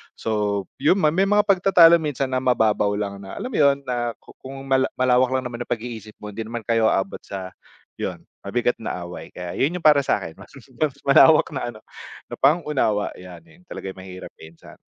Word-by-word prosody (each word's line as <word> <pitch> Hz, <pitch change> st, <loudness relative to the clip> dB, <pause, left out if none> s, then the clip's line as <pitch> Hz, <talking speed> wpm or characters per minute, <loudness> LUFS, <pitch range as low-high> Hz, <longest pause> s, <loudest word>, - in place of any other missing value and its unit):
So, 105 Hz, -2 st, -1 dB, 0.2 s
yun, 145 Hz, +6 st, +4 dB
may 170 Hz, +6 st, +3 dB
mga 205 Hz, +1 st, +4 dB
pagtatalo 180 Hz, -4 st, +6 dB
minsan 140 Hz, -4 st, -3 dB
na 130 Hz, -, +1 dB
mababaw 110 Hz, -5 st, +1 dB
lang 100 Hz, -1 st, -4 dB
na, 95 Hz, -1 st, -9 dB
alam 255 Hz, -, -5 dB
mo -, -, -3 dB
yun, 140 Hz, -1 st, +3 dB
na 120 Hz, -2 st, -3 dB
ku -, -, -15 dB
kung 135 Hz, +1 st, -9 dB
mala 135 Hz, -1 st, +2 dB
malawak 130 Hz, 0 st, +3 dB
lang 130 Hz, -, -1 dB
naman 120 Hz, -1 st, -6 dB
yung 120 Hz, -, -2 dB
pag-iisip 110 Hz, -2 st, -9 dB
mo 105 Hz, -, -6 dB
hindi 110 Hz, +2 st, -6 dB
naman 115 Hz, 0 st, -6 dB
kayo 115 Hz, -1 st, +2 dB
abot 95 Hz, -2 st, -1 dB
sa 95 Hz, -2 st, -8 dB, 0.5 s
yun, -, -, -4 dB, 0.2 s
mabigat 120 Hz, +4 st, 0 dB
na 90 Hz, -5 st, -5 dB
away. 85 Hz, -, -9 dB
Kaya 90 Hz, -1 st, -7 dB
yun 155 Hz, +7 st, 0 dB
yung 170 Hz, -, -12 dB
para 150 Hz, -2 st, +6 dB
sa'kin, 80 Hz, -10 st, -1 dB
mas -, -, -14 dB, 0.3 s
mas 145 Hz, -3 st, 0 dB
malawak 150 Hz, +3 st, +6 dB
na 135 Hz, -, -3 dB
ano, 110 Hz, -, -11 dB, 0.5 s
na -, -, -11 dB
pang-unawa, 135 Hz, -8 st, +1 dB
yan. 90 Hz, -1 st, -11 dB
Yun 165 Hz, +1 st, -21 dB
talaga -, -, -8 dB
ay -, -, -30 dB
mahirap 95 Hz, 0 st, -10 dB
minsan. 80 Hz, +1 st, -15 dB
125 Hz, 200 wpm, -22 LUFS, 105-145 Hz, 0.5 s, pagtatalo